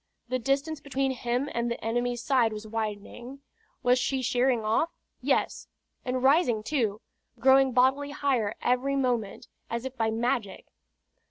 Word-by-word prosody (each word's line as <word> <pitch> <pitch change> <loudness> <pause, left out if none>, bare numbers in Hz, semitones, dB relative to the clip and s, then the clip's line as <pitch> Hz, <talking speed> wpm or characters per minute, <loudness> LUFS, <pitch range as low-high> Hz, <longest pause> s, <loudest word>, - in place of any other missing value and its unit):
The 255 0 0
distance 275 +5 0
between 275 -1 -1
him 250 +1 -1
and 235 0 -1
the 235 - -5
enemy's 240 +1 -1
side 240 -5 +2
was 215 0 -7
widening. 225 +4 -5 0.4
Was 250 +1 +4
she 260 +1 -1
sheering 250 -1 +2
off? 225 +10 +2 0.3
Yes - - 0 0.4
and 255 0 -2
rising 265 -6 +3
too, 220 -6 -1 0.4
growing 265 +2 +5
bodily 265 +3 +3
higher 265 -7 0
every 255 +3 +1
moment, 245 -6 -1 0.2
as 235 +2 -3
if 265 0 -5
by 225 -3 +1
magic. 225 -3 -1
250 Hz, 145 wpm, -28 LUFS, 230-270 Hz, 0.4 s, growing